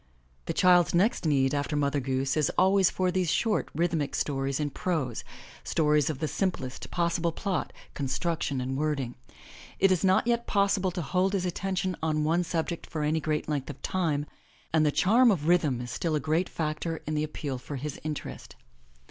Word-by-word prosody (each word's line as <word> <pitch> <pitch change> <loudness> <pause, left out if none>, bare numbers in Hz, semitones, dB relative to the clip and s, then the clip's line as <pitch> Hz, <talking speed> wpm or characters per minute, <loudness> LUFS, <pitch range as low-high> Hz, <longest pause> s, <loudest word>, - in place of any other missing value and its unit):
The - - -1
child's 180 -3 +4
next 185 -1 +2
need 135 -2 +2
after 145 +1 -1
Mother 145 0 +1
Goose 135 0 -1
is 155 -3 +2
always 190 0 +5
for 185 -1 0
these 185 -2 0
short 225 -3 +1
rhythmic 160 -3 0
stories 135 -1 -1
in 145 -1 -1
prose, 140 -9 -2 0.4
stories 150 -2 +2
of 155 - -2
the 155 - -2
simplest 145 -9 -3
possible 170 -1 0
plot, 185 0 -2 0.2
construction 140 +1 -1
and 130 +1 -3
word 150 0 0
ing. 125 -2 -4 0.6
It 195 0 +4
is 185 -1 +2
not 190 +2 +4
yet 235 0 0
possible 200 -2 +2
to 175 -1 -4
hold 185 +6 +1
his 190 -2 0
attention 185 +1 -2
on 155 -1 0
one 165 +3 +2
subject 170 0 -3
for 155 -3 -3
any 155 +2 +1
great 155 -1 -2
length 145 -3 -2
of - - -7
time, 155 -6 0 0.5
and 160 -1 +4
the 150 - +3
charm 235 - +5
of 165 -8 +1
rhythm 160 -8 +3
is 120 0 -6
still 155 +5 -1
a - - +1
great 160 +4 0
factor 160 +1 -3
in 155 - -3
the 150 0 0
appeal 145 -3 -4
for 145 - -7
his 140 +2 -5
interest. 155 -1 -6
155 Hz, 190 wpm, -28 LUFS, 145-180 Hz, 0.6 s, always